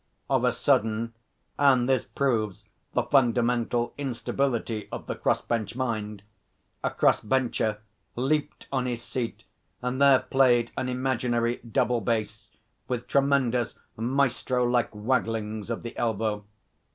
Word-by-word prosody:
Of - - +3
a - - +4
sudden 115 +1 +1 0.5
(and 130 -4 +5
this 130 -1 +2
proves 110 -8 -1 0.3
the - - +2
fundamental 120 -2 +2
instability 120 -4 -2
of - - -6
the - - -3
cross - - 0
bench 115 -1 -2
mind) 110 -5 -3 0.6
a - - +2
cross - - +3
bencher 115 -2 0 0.4
leaped 150 +4 -1
on 130 -2 0
his 120 -1 -3
seat 115 -3 -4 0.4
and 125 +2 -2
there 140 -1 +7
played 125 -3 +3
an 130 - -2
imaginary 125 -2 0
double 120 +1 0
bass 110 -2 -2 0.4
with 125 -1 -2
tremendous 135 -4 +2 0.2
maestro 125 +1 +1
like 120 -1 +2
wagglings 110 -1 -1
of 115 - -3
the 115 - -7
elbow. 110 -2 -1
120 Hz, 125 wpm, -27 LUFS, 115-130 Hz, 0.6 s, there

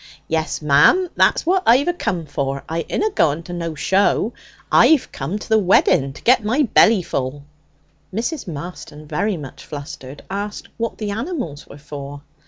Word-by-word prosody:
'Yes, 160 -1 -2
mum. 340 - +5
That's - - +3
what 370 +2 +2
I've 255 +5 +6
acome 185 - -2
for. 140 -1 -3
I 165 +1 -2
inna 435 - 0
going 160 - +1
to 175 - -8
no 170 -2 -4
show. 200 +7 +1 0.4
I've 315 -5 +5
come 150 +9 -4
to - - -9
the 220 -1 +4
wedding 175 -8 +3
to - - -14
get 245 -1 +4
my 245 +8 +2
belly 220 -5 +4
full.' 135 -1 -3 0.7
Mrs. 240 - -3
Marston, 155 -1 -8
very 195 +5 -1
much 140 -4 -9
flustered, 140 -2 -9
asked 205 +2 -5
what 230 0 -3
the 210 -2 -3
animals 225 - -4
were - - -12
for. 145 -1 -9
175 Hz, 165 wpm, -20 LUFS, 145-230 Hz, 0.7 s, I've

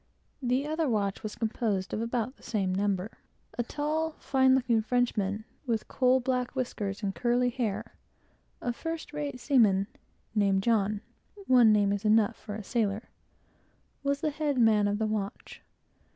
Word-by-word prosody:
The 255 +2 +1
other 310 -1 0
watch 200 -4 0
was 215 - -5
composed 215 -4 -1
of 215 - -1
about 235 +2 -2
the - - -24
same 195 -5 -1
number. 195 +1 -1 0.4
A - - 0
tall, 305 +5 -2
fine 265 -3 +3
looking 245 -4 +2
Frenchman, 215 -3 0 0.2
with 225 -2 -1
coal 255 0 +3
black 250 0 -1
whiskers 210 -5 -3
and 195 -1 -1
curly 245 +2 +1
hair, 235 -5 -3 0.7
a 245 - -1
first 325 +3 -5
rate 290 -3 -4
seaman, 220 -8 +4
and - - -34 0.4
named 195 -2 +3
John, 210 -2 +1 0.4
(one 245 -6 +6
name 205 -1 +3
is 205 +1 -3
enough 215 -1 +4
for 210 -1 -8
a 215 - -6
sailor,) 215 0 -1 0.9
was 280 0 -1
the 305 - 0
head 290 -2 -1
man 215 -3 +4
of 205 0 0
the 220 - 0
watch. 210 -2 -4
230 Hz, 160 wpm, -29 LUFS, 205-260 Hz, 0.9 s, one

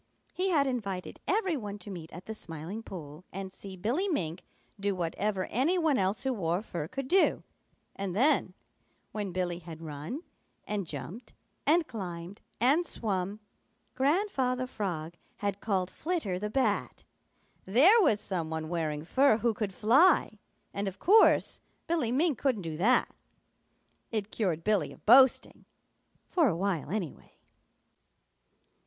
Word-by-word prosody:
He 375 +1 0
had 300 -6 +3
invited 200 -8 -3
every 385 -4 +1
one 210 -6 -5
to 205 0 -9
meet 170 -3 -8
at 175 +3 -10
the 220 - -5
Smiling 170 +2 -6
Pool 160 -6 -9
and 190 0 -6
see 190 -1 -9
Billy 245 - 0
Mink 175 - -2 0.4
do 200 0 0
whatever 185 +3 -1
any 285 - +2
one 315 -6 +2
else 195 +2 0
who 265 -1 0
wore 180 -2 -1
fur 170 -8 -5
could 270 +7 -5
do, 380 +6 +3 0.5
and 195 -2 -4
then, 255 -6 +3 0.6
when 205 -3 -3
Billy 175 -1 -2
had 165 -2 -10
run 155 - -6 0.4
and 205 -4 -3
jumped 155 - -7 0.3
and 325 +3 +4
climbed 180 -4 -7 0.2
and 275 +9 +4
swum, 205 - -3 0.5
Grandfather 265 -3 +1
Frog 175 -9 -4 0.2
had 200 -1 -3
called 190 -4 0
Flitter 310 - -2
the 210 +2 -3
Bat. 265 +5 0 0.6
There 310 - +6
was 255 - +3
some 175 -6 -3
one 160 0 -4
wearing 155 -3 -2
fur 265 +4 +4
who 230 0 +1
could 210 -2 -3
fly, 230 - +4 0.3
and 200 0 -2
of 195 0 -5
course 425 - +4 0.2
Billy 325 -9 0
Mink 290 0 +1
couldn't 250 -9 0
do 160 -2 -4
that. 235 +9 +3 1.0
It 215 -2 -3
cured 175 -7 -1
Billy 210 0 +1
of - - -16
boasting, 260 +3 +5 0.6
for 335 -5 +3
a 175 -8 0
while, 185 -5 -1
anyway. 185 -5 -5
205 Hz, 145 wpm, -30 LUFS, 180-260 Hz, 1.0 s, There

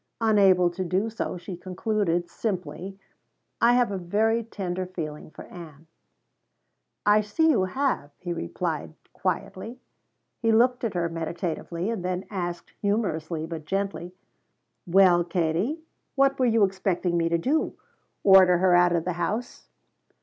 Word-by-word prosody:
Unable 195 -5 +4
to 185 +2 -4
do 190 +5 -1
so, 220 -4 -4
she 180 +1 -7
concluded 185 -1 -1
simply: 185 -2 -4 0.6
"I 235 +1 +6
have 245 -3 +3
a 195 - -3
very 220 +6 +1
tender 185 -4 -4
feeling 155 -5 -6
for - - -11
Ann." 160 -3 -12 1.2
"I 210 +1 +5
see 315 +11 +2
you 195 -9 +2
have," 250 - -1
he 175 -1 -4
replied 165 -2 -4 0.2
quietly. 190 +6 -4 0.6
He 225 -1 +2
looked 245 +3 +3
at 220 -5 -2
her 170 -1 +1
meditatively, 170 +3 -3
and 215 -6 -4
then 180 0 -2
asked, 175 -3 -5
humorously 170 -7 -1
but 160 -2 -7
gently: 185 -1 -3 0.7
"Well 180 -1 +5
Katie, 175 - -1 0.3
what 275 0 +3
were 255 - +3
you 225 -2 +3
expecting 185 -2 0
me 165 -1 +1
to 170 - +2
do? 280 - 0 0.5
Order 190 -2 +7
her 180 0 +3
out 175 0 +4
of 165 - -1
the 180 - -1
house?" 220 +8 -3
185 Hz, 140 wpm, -26 LUFS, 170-215 Hz, 1.2 s, Order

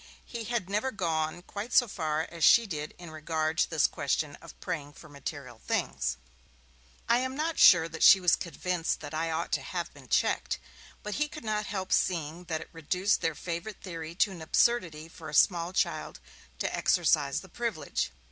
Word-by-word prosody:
He 235 -2 -6
had 235 -5 -2
never 210 +6 0
gone 170 -5 -2
quite 210 +6 -6
so 245 - +6
far 160 -5 -2
as 170 -2 -5
she 235 - +7
did 155 -6 -5
in 175 -2 -10
regard 155 +1 -2
to - - +3
this 160 -3 +3
question 145 +1 -1
of - - -14
praying 145 -2 -4
for 155 - -14
material 140 -4 -8
things. 60 - -1 0.9
I 235 +1 +4
am 260 +1 -2
not 315 +3 -1
sure 165 -3 +8
that 160 -1 -8
she 195 - +9
was 180 -2 +4
convinced 175 -1 -2
that - - -8
I 165 +1 -1
ought 165 +1 -2
to - - +1
have 175 -2 -4
been 140 -3 -15
checked; - - +1 0.5
but 210 - -4
he 300 - +3
could 305 - -9
not 215 -1 -1
help 190 -2 -2
seeing 170 -1 0
that 160 -2 -3
it - - -10
reduced 180 +5 0
their 165 -3 0
favourite 175 +6 -5
theory 165 -3 -6
to 195 +2 +2
an 175 -3 -9
absurdity 165 -3 +1
for 165 -1 -10
a 150 - -4
small 170 +2 +4
child 190 - -1 0.4
to - - -2
exercise - - +2
the - - -13
privilege. - - -2
170 Hz, 190 wpm, -29 LUFS, 155-200 Hz, 0.9 s, she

